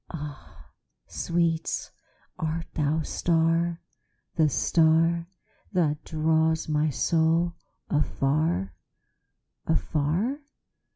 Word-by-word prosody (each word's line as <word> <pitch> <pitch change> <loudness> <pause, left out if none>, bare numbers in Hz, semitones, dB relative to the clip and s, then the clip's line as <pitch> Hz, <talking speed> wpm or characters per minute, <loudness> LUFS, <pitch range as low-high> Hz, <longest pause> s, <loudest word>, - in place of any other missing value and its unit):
Ah, 150 -4 -9 0.3
sweet, 170 -1 -1 0.5
art 160 +1 -2
thou 150 0 +1
the 160 - -2
star, 165 0 +1 0.5
the 160 - +3
starThat 165 +1 +1
draws 160 0 +1
my 155 0 +1
soul 165 +3 +2 0.4
afar, 135 - 0 0.9
afar? 160 - 0
160 Hz, 70 wpm, -26 LUFS, 150-170 Hz, 0.9 s, the